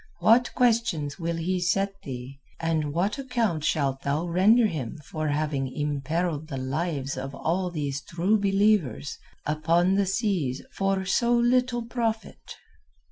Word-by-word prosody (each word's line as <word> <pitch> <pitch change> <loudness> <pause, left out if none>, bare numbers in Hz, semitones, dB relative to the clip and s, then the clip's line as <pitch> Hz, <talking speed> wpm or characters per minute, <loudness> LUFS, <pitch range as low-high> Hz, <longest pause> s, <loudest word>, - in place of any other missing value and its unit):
What 225 +8 +4
questions 220 - +1
will 170 0 -2
he 180 +3 -1
set 195 +2 +1
thee, 130 +1 -7 0.2
and 160 -3 0
what 190 - 0
account 235 - -1
shalt 140 -4 0
thou 145 +4 -1
render 200 +7 +4
him 155 - -3
for 155 -1 -3
having 145 -3 -1
imperilled 150 +2 -2
the 140 -4 -5
lives 135 +1 -2
of 135 +1 -5
all 180 +5 -1
these 145 -4 -3
True 180 +8 +1
Believers 195 - +1 0.3
upon 165 +4 +2
the 200 0 +2
seas 185 - -1
for 195 -1 0
so 235 +5 +2
little 240 0 +2
profit?" 230 -2 -3
170 Hz, 135 wpm, -26 LUFS, 145-205 Hz, 0.3 s, What